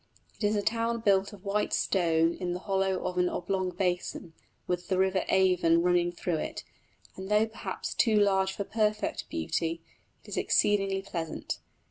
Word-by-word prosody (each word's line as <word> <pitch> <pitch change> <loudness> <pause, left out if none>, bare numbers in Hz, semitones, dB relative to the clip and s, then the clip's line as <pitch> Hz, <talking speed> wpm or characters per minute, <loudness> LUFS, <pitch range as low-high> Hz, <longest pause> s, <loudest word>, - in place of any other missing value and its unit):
It - - -6
is 205 +1 +2
a 205 - 0
town 230 +1 0
built 200 -2 +3
of 205 -1 -13
white 205 +1 0
stone 165 -3 +2
in 180 -1 -3
the 180 - -4
hollow 190 -1 0
of 180 0 -1
an 180 0 +3
oblong 185 +1 -1
basin, 180 -2 -2 0.3
with 180 0 -2
the 190 - 0
river 190 0 +2
Avon 180 -3 +4
flowing 175 0 +2
through 175 -1 -2
it; - - -5 0.5
and 190 +1 -7
though 210 +1 +4
perhaps 225 0 -5
too 225 -2 +3
large 195 -2 +3
for 200 - -4
perfect 215 0 -1
beauty, 160 - -2 0.4
it - - -19
is - - -5
exceedingly 195 -2 +2
pleasant. 165 -4 -4
190 Hz, 170 wpm, -29 LUFS, 175-205 Hz, 0.5 s, Avon